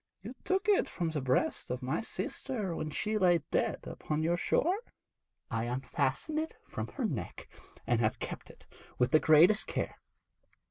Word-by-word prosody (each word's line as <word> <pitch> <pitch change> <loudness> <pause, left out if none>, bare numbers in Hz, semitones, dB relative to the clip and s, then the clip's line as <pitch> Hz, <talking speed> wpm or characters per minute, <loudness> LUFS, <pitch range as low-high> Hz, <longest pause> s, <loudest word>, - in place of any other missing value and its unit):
'You 225 +5 -6
took 385 +2 0
it 410 -2 +4
from 170 -3 -2
the 150 -2 -2
breast 130 0 0
of 125 +1 -3
my 130 - 0
sister 220 -5 -3
when 155 - -3
she 215 +8 -1
lay 180 -3 +5
dead - - +1
upon 155 0 -3
your 170 +2 +2
shore?' 350 - +1 0.7
'I 115 +1 0
unfastened 130 - -1
it 320 0 -4
from - - -4
her 265 - -2
neck, 140 - -4 0.4
and 120 -2 +2
have 110 -1 +1
kept - - -6
it - - -16 0.3
with 125 0 +2
the 155 - +6
greatest 170 +8 +6
care. - - -3
165 Hz, 170 wpm, -32 LUFS, -, 0.7 s, the